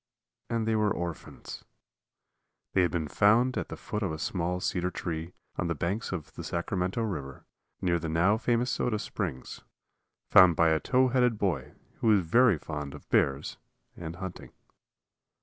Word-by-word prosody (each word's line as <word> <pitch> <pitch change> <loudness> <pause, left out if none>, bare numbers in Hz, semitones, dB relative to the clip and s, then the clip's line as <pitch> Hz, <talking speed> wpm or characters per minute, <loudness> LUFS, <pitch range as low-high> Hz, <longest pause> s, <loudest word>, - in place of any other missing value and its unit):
And 115 -1 -1
they 110 - +2
were 105 -1 +2
orphans. 85 -4 -6 1.1
They 95 - +4
had 90 - +3
been 80 -4 -2
found 115 - +3
at - - -3
the - - -6
foot 105 -2 -4
of 95 -5 -1
a 80 - -4
small 90 +2 -2
cedar 90 -1 -1
tree 85 -1 -5 0.2
on - - -1
the 85 - -1
banks 95 +9 -2
of 85 -5 -5
the - - -7
Sacramento 90 +5 -2
River, 70 -11 -5 0.4
near 85 -1 +1
the 80 0 -4
now 90 +7 +3
famous 120 +1 +1
Soda 110 -3 0
Springs, 90 -10 -5 0.7
found 90 -4 +7
by 85 +1 +4
a 80 0 +3
tow 130 +6 +3
headed 125 -3 +2
boy 100 -4 -2 0.2
who - - -1
was 105 -3 +5
very 105 +4 +4
fond 75 -2 -6
of - - -13
bears 70 +1 +1 0.4
and 85 -1 -7
hunting. 95 0 -7
90 Hz, 165 wpm, -29 LUFS, 80-110 Hz, 1.1 s, found